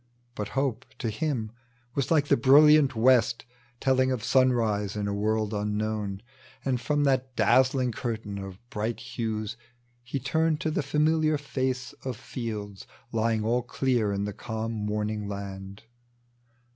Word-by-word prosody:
But 105 -3 -4
Hope 130 -3 -1
to 115 -4 -2
him 115 -3 -2 0.4
was 140 -1 -1
like 150 -3 +3
the 140 - +5
brilliant 140 +2 +6
west 115 -1 +3 0.3
Telling 130 -1 +2
of 125 -4 -2
sunrise 115 -7 +2
in 105 -1 -2
a 100 - -1
world 110 +1 0
unknown. 105 -1 -2 0.4
And 130 -3 0
from 145 -1 +1
that 130 -2 +1
dazzling 130 -1 +3
curtain 110 -4 -4
of 95 -1 -7
bright 110 +1 -2
hues 110 -2 -4 0.4
He 130 +3 -4
turned 160 +4 +1
to 155 - 0
the - - 0
familiar 155 +2 +2
face 130 -3 -2
of 130 -4 -4
fields 105 -5 -6 0.2
Lying 110 -1 +1
all 120 +2 +2
clear 120 -3 0
in 100 0 -1
the 105 0 -3
calm 110 +1 -4
morning 105 -1 -2
land. 100 0 -7
115 Hz, 145 wpm, -27 LUFS, 105-130 Hz, 0.4 s, brilliant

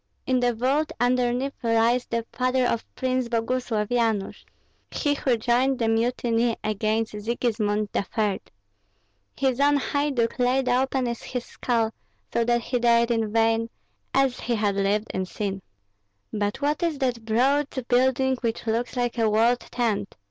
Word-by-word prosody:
In 255 -1 +2
the 245 -1 +1
vault 270 +7 +1
underneath 250 +2 +1
lies 230 +1 +2
the 230 -1 -2
father 255 0 +1
of 230 -1 0
Prince 255 -1 -1
Boguslav, 230 -2 -1
Yanush, 225 -5 0 0.4
he 290 -2 0
who 260 -4 +1
joined 250 +4 +2
the 230 - 0
mutiny 230 0 +1
against 215 +1 0
Sigismund 215 -1 -1
III. 205 -1 -1 1.0
His 265 -1 +1
own 285 +1 +4
haiduk 280 -5 -1
laid 255 +1 +2
open 260 +1 +1
his 240 +1 -4
skull, 230 -3 -1 0.4
so 235 - +2
that 240 0 +2
he 245 +1 -1
died 235 0 +3
in 225 -2 0
vain, 225 +1 +2 0.4
as 270 -2 +2
he 240 - -1
had 210 -2 +1
lived 200 +2 0
in 190 0 -2
sin." 195 0 -4 0.7
"But 205 -1 -2
what 295 +4 +1
is 335 -4 0
that 250 -4 -1
broad 265 +6 +2 0.2
building 260 +1 +2
which 230 -2 -3
looks 230 +3 -1
like 245 -1 -1
a 225 -1 +3
walled 230 +3 +3
tent?" 220 -6 -2
240 Hz, 150 wpm, -25 LUFS, 225-255 Hz, 1.0 s, own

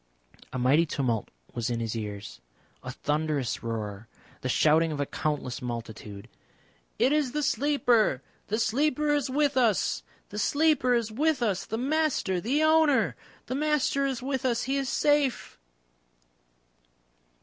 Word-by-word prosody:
A - - -4
mighty 140 +7 +3
tumult 125 -7 -1 0.2
was 120 0 -2
in 120 -1 -1
his 115 -1 -3
ears, 100 - -6 0.4
a - - -7
thunderous 150 -4 -1
roar, 110 -2 -5 0.3
the 130 - -3
shouting 160 +4 +3
of 150 - -4
a 145 - +1
countless 145 -3 -3
multitude. 115 -4 -7 0.7
"It 255 +3 +3
is 295 -5 +1
the 300 0 -1
Sleeper! 245 - +2 0.2
The 215 - -1
Sleeper 295 +6 +1
is 290 -3 0
with 285 +1 +1
us!" 235 -6 +2 0.3
"The 210 - -5
Sleeper 285 -1 +3
is 230 -2 -1
with 285 +2 +1
us! 200 -5 -1
The 220 - -3
Master 270 - 0
the 275 - +1
Owner! 315 -3 +4 0.3
The - - -4
Master 295 -1 +1
is 255 -2 -3
with 265 -1 -2
us. 240 -2 +1
He 270 +2 -1
is 275 -2 -1
safe." 290 -3 +1
230 Hz, 145 wpm, -27 LUFS, -, 0.7 s, Owner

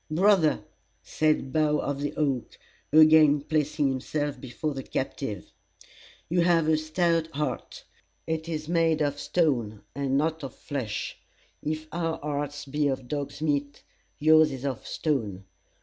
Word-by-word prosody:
"Brother," 175 -1 +3 0.4
said 155 -4 0
Bough 150 -1 +3
of 140 -1 -2
the 145 - -3
Oak, 135 -5 -1 0.3
again 155 -1 +7
placing 150 0 0
himself 145 +2 -2
before 145 +3 -4
the 135 - -4
captive, 125 - -4 0.8
"you 175 +1 +2
have 170 -2 +3
a 160 - +4
stout 165 +1 +1
heart. 150 -2 -3 0.4
It 160 0 -3
is 155 -2 -4
made 165 -2 +2
of 145 0 -1
stone, 120 - 0
and 135 -1 0
not 160 +2 0
of 135 - -6
flesh. 130 -7 -4 0.4
If 155 +1 -3
our 165 -1 -1
hearts 145 0 -4
be 145 +1 0
of 130 -2 -2
dog's 145 +2 -4
meat, 145 -1 -1 0.3
yours 155 +1 +5
is 135 0 -6
of 130 -4 -4
stone. 110 - -2
150 Hz, 140 wpm, -27 LUFS, 140-155 Hz, 0.8 s, again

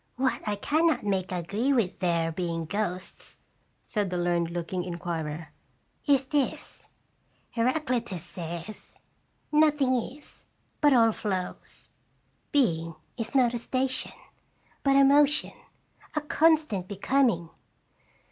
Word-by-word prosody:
" - - -42
What - - -1
I 210 - +1
can 310 +11 +2
not 320 - +1
make 190 -2 0
agree 200 +9 -1
with 230 -9 +1
there 170 -3 +1
being 165 -1 -2
ghosts," 185 +1 -4 0.5
said 205 -3 -1
the 180 - -2
learned 175 -1 +1
looking 175 +1 -3
in 175 -1 -5
quirer, 160 -2 -4 0.6
"is 275 -2 +4
this: 280 0 -2 0.6
Heraclitus 235 - 0
says, 175 +3 -7 0.5
'Nothing 300 -3 +4
is, 255 +4 -5 0.3
but 295 -1 +6
all 230 -3 +6
flows; 190 -4 -5 0.6
being 165 - +1 0.2
is 230 +3 -5
not 250 -3 +4
a 240 - -2
station, 260 +2 -1 0.7
but 275 -1 +3
a 275 - +7
motion, 290 +2 +4 0.6
a 305 - +1
constant 305 - +2
becoming.' 200 -4 +1
215 Hz, 120 wpm, -28 LUFS, 175-275 Hz, 0.7 s, a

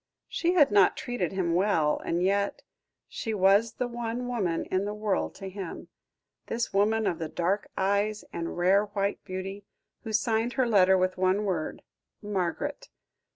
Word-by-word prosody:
She 345 +1 0
had 295 -9 +5
not 200 -2 +5
treated 245 -9 -2
him 180 -3 0
well, 170 -5 +2
and 170 +1 0
yet 200 +1 0 0.4
she 225 -2 -4
was 200 +4 +4
the 250 - -2
one 240 +1 -4
woman 195 -9 -1
in 190 +1 +1
the 210 +1 -3
world 210 -2 -1
to 195 - -7
him 190 -2 -7 0.6
this 235 +1 -2
woman 215 +3 +2
of 170 - -1
the 160 -1 -3
dark 185 +6 -1
eyes 200 +2 0
and 165 0 -4
rare 190 +4 +4
white 200 -1 -2
beauty, 195 +1 -6 0.4
who 220 - -5
signed 225 +2 +1
her 260 - +2
letter 190 -4 +5
with 185 0 +1
the 185 - -10
one 190 +3 +2
word, 175 -6 -3 0.4
"Margaret." 210 - -3
200 Hz, 165 wpm, -28 LUFS, 185-220 Hz, 0.6 s, had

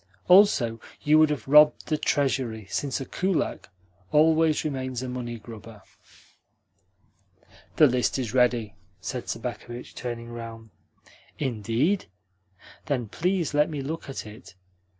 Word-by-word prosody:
Also, 145 - +5 0.2
you 155 +1 +5
would 155 -1 +5
have 140 -6 -3
robbed 150 +2 +6
the 155 - 0
Treasury, 130 -7 -1
since 140 -2 -2
a 135 - -5
kulak 185 - -2 0.4
always 160 0 +3
remains 130 -3 -3
a - - -4
money 120 -2 -5
grubber." 110 -2 -12 1.9
"The 155 - +7
list 125 -2 +1
is 125 -4 -3
ready," 120 -5 +2 0.3
said - - -5
Sobakevitch, 120 +1 -6
turning 120 -1 -6
round. 115 -2 -9 0.7
"Indeed? 130 - 0 0.8
Then 125 -7 -1
please 175 - -1
let 150 +1 +3
me 150 -3 -4
look 155 +2 -5
at 135 - -6
it." 105 -1 -13
130 Hz, 125 wpm, -26 LUFS, 115-150 Hz, 1.9 s, The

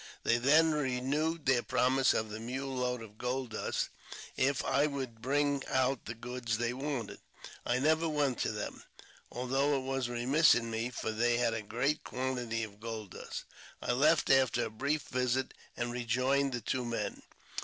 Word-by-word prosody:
They 115 +1 +3
then 155 +6 +5
renewed 150 +3 0
their 130 -3 +4
promise 130 +2 +3
of 110 -1 -1
the 110 - -5
mule 130 +4 -4
load 125 -2 -1
of 110 -1 -13
gold 125 -1 -2
dust 110 - -2 0.5
if 135 +1 +1
I 145 +2 +3
would 130 -6 -5
bring 140 +2 +1
out 130 -1 +1
the 110 - -5
goods 120 -1 -3
they 120 +1 0
wanted. 135 -4 -4 0.5
I 120 - +2
never 160 +4 +2
went 145 -4 0
to - - 0
them, - - -5 0.5
although 135 +3 +1
it 130 - -3
was 135 -2 -1
remiss 130 +6 +4
in 115 -1 -2
me, 115 +2 -1
for 115 -2 -3
they 120 +2 +2
had 120 -2 +2
a 110 - -2
great 130 +8 -1
quantity 125 -3 -2
of 105 -2 -8
gold 110 -3 -6
dust. - - -6 0.4
I - - -1
left 150 +5 +4
after 130 -3 +4
a - - -6
brief 140 +7 -1
visit, 130 +1 0 0.2
and 120 0 -1
rejoined 130 +3 +1
the 120 - -2
two 125 +4 -1
men. 115 -4 -3
125 Hz, 175 wpm, -32 LUFS, 120-140 Hz, 0.5 s, then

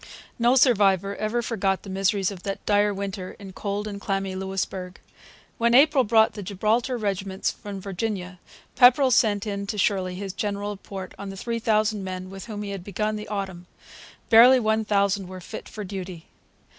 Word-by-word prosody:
No 240 +2 +4
survivor 200 -6 +3
ever 225 +3 -1
forgot 195 -5 -1
the 200 - -9
miseries 195 0 +1
of 190 -3 -9
that 195 +1 -5
dire 205 0 +3
winter 195 -2 -5
in 195 -2 -10
cold 205 +2 -3
and 200 -1 -6
clammy 195 -2 -2
Louisbourg. 190 -1 -4 0.6
When 235 +1 +3
April 285 0 +6
brought 220 0 +4
the 205 - -7
Gibraltar 215 +6 0
regiments 195 -3 -2
from 200 -1 -8
Virginia, 190 -1 -4 0.4
Pepperrell 255 +2 +6
sent 210 -3 +3
in 200 -1 -4
to 210 - -3
Shirley 185 -2 0
his 195 0 -5
general 205 0 -3
report 195 -2 -8
on 200 0 -6
the 195 - -8
three 230 +3 -3
thousand 215 -2 +1
men 185 0 -6
with 195 0 -8
whom 210 -2 -6
he 200 - -5
had 195 -3 -6
begun 210 +3 -2
the 210 0 -6
autumn. 190 -4 -5 0.6
Barely 245 +3 +8
one 220 -1 +1
thousand 200 -2 +1
were 185 0 -8
fit 200 +5 -9
for 210 - -7
duty. 185 -3 -7
200 Hz, 180 wpm, -25 LUFS, 190-215 Hz, 0.6 s, Barely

